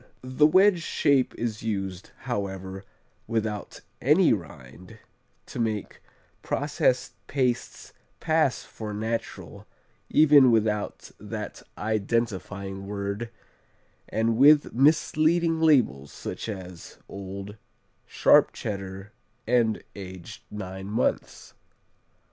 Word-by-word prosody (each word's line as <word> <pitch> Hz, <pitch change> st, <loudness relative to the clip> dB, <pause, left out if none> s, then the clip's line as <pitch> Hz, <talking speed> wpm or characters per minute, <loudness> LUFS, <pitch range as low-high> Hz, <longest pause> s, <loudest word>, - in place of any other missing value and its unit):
The 130 Hz, +4 st, +3 dB
wedge 185 Hz, +2 st, +5 dB
shape 140 Hz, -5 st, +1 dB
is 115 Hz, -2 st, -3 dB
used, 95 Hz, -4 st, -4 dB
however, 95 Hz, -5 st, -4 dB, 0.4 s
without 110 Hz, -3 st, -3 dB, 0.2 s
any 155 Hz, +5 st, +5 dB
rind, 90 Hz, -, -9 dB, 0.5 s
to -, -, -8 dB
make 110 Hz, -3 st, -3 dB, 0.4 s
processed 140 Hz, -3 st, 0 dB
pastes 125 Hz, -3 st, -2 dB, 0.3 s
pass 155 Hz, -4 st, +1 dB
for 105 Hz, -2 st, -7 dB
"natural" 110 Hz, +2 st, -5 dB, 0.4 s
even 145 Hz, -4 st, +6 dB
without 110 Hz, -2 st, 0 dB
that -, -, -6 dB, 0.2 s
identifying 100 Hz, -3 st, -2 dB
word, 100 Hz, +3 st, -4 dB, 0.8 s
and 115 Hz, 0 st, 0 dB
with 145 Hz, +3 st, +6 dB
misleading 160 Hz, +4 st, +3 dB
labels 120 Hz, -, +3 dB
such -, -, -6 dB
as 90 Hz, -4 st, -8 dB
old, 100 Hz, +1 st, -8 dB, 0.5 s
sharp -, -, +4 dB
Cheddar 95 Hz, 0 st, -6 dB, 0.3 s
and 115 Hz, -2 st, +1 dB
"aged 95 Hz, -3 st, -9 dB
nine 95 Hz, -2 st, -7 dB
months." 105 Hz, +2 st, -2 dB
110 Hz, 90 wpm, -26 LUFS, 100-130 Hz, 0.8 s, even